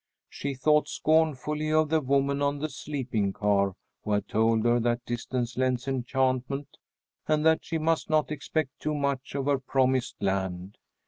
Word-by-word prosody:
She 140 -1 -4
thought 150 +3 +3
scornfully 155 -1 +1
of 155 -1 +3
the 160 0 +2
woman 140 +1 +1
on 145 0 +1
the 155 +2 -3
sleeping 130 -8 -2
car 100 -2 +1 0.3
who 105 - -1
had 105 - 0
told 110 0 +2
her 120 0 +4
that 120 +1 0
distance 120 0 -3
lends 130 0 0
enchantment, 130 +1 -1 0.5
and 155 0 +2
that 160 0 +4
she 165 - -2
must 160 0 0
not 155 -3 +2
expect 150 -1 -2
too 155 0 -2
much 140 -2 -2
of 140 -1 -1
her 140 -1 +2
promised 130 -1 +1
land. 95 0 -2
135 Hz, 160 wpm, -27 LUFS, 120-150 Hz, 0.5 s, her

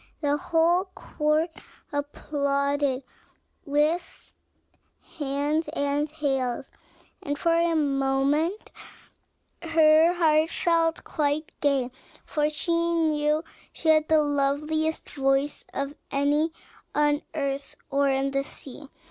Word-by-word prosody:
The 290 -1 +1
whole 335 +4 +2
court 305 +2 0 0.4
applauded 280 -1 -1
her - - -37 0.6
with 305 +5 -1 0.9
hands 290 +3 0
and 285 +1 0
tails; 270 -5 -2 0.5
and 290 0 -3
for 335 +3 +2
a 335 0 +2
moment 280 +5 +1 0.9
her 320 0 +5
heart 320 -2 +3
felt 330 -1 +1
quite 300 0 -1
gay, 275 -4 +1 0.3
for 300 -1 0
she 305 +3 -3 0.2
knew 305 -1 +1 0.3
she 320 - -2
had 310 -1 +4
the 315 - +4
loveliest 295 +2 0
voice 270 +1 0
of 280 +1 -3 0.2
any 290 +3 +1 0.4
on 295 0 +2
earth 280 -2 -3 0.2
or 280 0 +2
in 270 0 0
the 275 0 0
sea. 275 +1 -9
295 Hz, 105 wpm, -26 LUFS, 280-315 Hz, 0.9 s, her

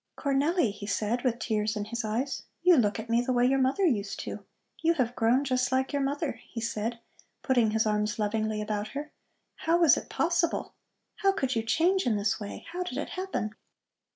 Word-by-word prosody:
"Cornelli," 285 - +2
he 205 0 -8
said 215 +4 0
with 245 -3 +1
tears 215 -2 -1
in 205 -1 -2
his 235 +2 -4
eyes, 235 +6 -2 0.2
"you 360 0 +7
look 210 -6 +2
at 220 - -6
me 230 +1 +3
the 250 +1 -1
way 245 -1 +3
your 270 +2 +3
mother 265 +9 +2
used 210 - 0
to. - - -6 0.4
You 335 +1 +3
have 250 -4 0
grown 240 +4 +3
just 255 -2 0
like 260 +2 +1
your 285 - +1
mother," 280 +2 -2
he 230 - -5
said, 230 0 -2 0.5
putting 245 -5 +3
his 220 +1 +1
arms 210 0 0
lovingly 215 0 -1
about 210 0 -2
her. 300 +1 -5 0.5
"How 330 +1 +2
was 335 -3 +6
it - - -6
possible? 340 0 0 0.4
How 390 -1 +3
could 265 -10 -1
you 225 - +2
change 330 +10 +2
in 220 -3 +2
this 200 0 0
way? 205 -1 -7
How 355 +1 -4
did 360 -8 -4
it 295 - -3
happen?" 370 - -3
245 Hz, 205 wpm, -28 LUFS, 215-290 Hz, 0.5 s, you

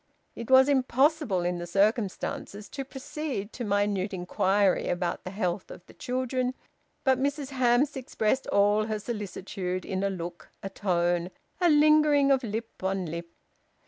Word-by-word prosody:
It 235 +1 -7
was 265 +1 +7
impossible, 270 - +2
in 175 0 -1
the 175 - -5
circumstances, 205 +1 -1
to 275 - -5
proceed 265 -5 -5
to 245 - -5
minute 205 -2 0
inquiry 190 +2 +1
about 175 0 -2
the - - -5
health 185 -1 -2
of 175 - -11
the - - -16
children, 255 0 -2 0.5
but 265 -1 +3
Mrs 285 0 -1
Hamps 255 +1 +2
expressed 260 -1 -1
all 205 +1 +3
her 215 -1 -1
solicitude 195 -4 -4
in 190 0 -2
a 200 - +1
look, 170 -3 -7
a 195 - -5
tone, 175 -3 0 0.3
a 350 - +5
lingering 300 -2 +5
of 265 -1 +3
lip 225 -2 -5
on 190 -1 -1
lip. 170 +1 -6
210 Hz, 150 wpm, -28 LUFS, 185-260 Hz, 0.5 s, was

